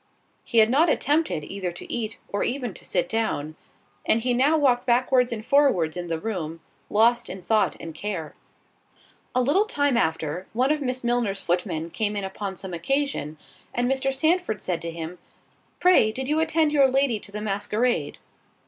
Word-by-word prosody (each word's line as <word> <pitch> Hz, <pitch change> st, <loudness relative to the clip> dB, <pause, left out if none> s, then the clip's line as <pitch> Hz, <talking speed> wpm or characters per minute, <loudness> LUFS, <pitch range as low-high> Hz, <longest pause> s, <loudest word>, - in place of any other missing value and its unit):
He 235 Hz, -, -3 dB
had 220 Hz, +1 st, +6 dB
not 315 Hz, +6 st, +4 dB
attempted 295 Hz, -, +1 dB
either 185 Hz, +2 st, -4 dB
to -, -, -8 dB
eat, 225 Hz, -2 st, -3 dB
or 200 Hz, -, -2 dB
even 245 Hz, -4 st, -2 dB
to -, -, -13 dB
sit 175 Hz, -2 st, -1 dB
down; 165 Hz, -8 st, -2 dB, 0.5 s
and 225 Hz, -, +3 dB
he 245 Hz, +2 st, 0 dB
now 280 Hz, +6 st, +3 dB
walked 255 Hz, -4 st, +2 dB
backwards 250 Hz, +1 st, +3 dB
and 220 Hz, -2 st, -5 dB
forwards 250 Hz, -, +3 dB
in 175 Hz, -1 st, -4 dB
the 165 Hz, -1 st, -1 dB
room, 165 Hz, -5 st, -4 dB, 0.3 s
lost 235 Hz, +3 st, +3 dB
in 185 Hz, -1 st, -7 dB
thought 215 Hz, +3 st, +2 dB
and 165 Hz, -, -7 dB
care. 165 Hz, -2 st, -5 dB, 1.0 s
A 255 Hz, -, +3 dB
little 315 Hz, -, +3 dB
time 285 Hz, -, +1 dB
after, 160 Hz, -3 st, -1 dB
one 255 Hz, +5 st, +2 dB
of 305 Hz, -1 st, 0 dB
Miss 255 Hz, -2 st, -2 dB
Milner's 235 Hz, -5 st, 0 dB
footmen 170 Hz, -2 st, -1 dB
came 210 Hz, +2 st, -1 dB
in 200 Hz, -, -2 dB
upon 190 Hz, 0 st, -5 dB
some 185 Hz, 0 st, -8 dB
occasion, 210 Hz, -, -1 dB, 0.4 s
and 245 Hz, 0 st, +1 dB
Mr. 270 Hz, +1 st, 0 dB
Sandford 315 Hz, -, 0 dB
said 175 Hz, -3 st, -2 dB
to 170 Hz, -, -4 dB
him, 165 Hz, +1 st, -7 dB, 0.6 s
"Pray 355 Hz, -12 st, +5 dB
did 260 Hz, +4 st, -4 dB
you 305 Hz, +2 st, +1 dB
attend 320 Hz, -1 st, +2 dB
your 280 Hz, -2 st, +6 dB
lady 265 Hz, -4 st, +2 dB
to 200 Hz, -, -11 dB
the 210 Hz, -, -5 dB
masquerade?" 210 Hz, +4 st, -1 dB
225 Hz, 180 wpm, -25 LUFS, 180-265 Hz, 1.0 s, had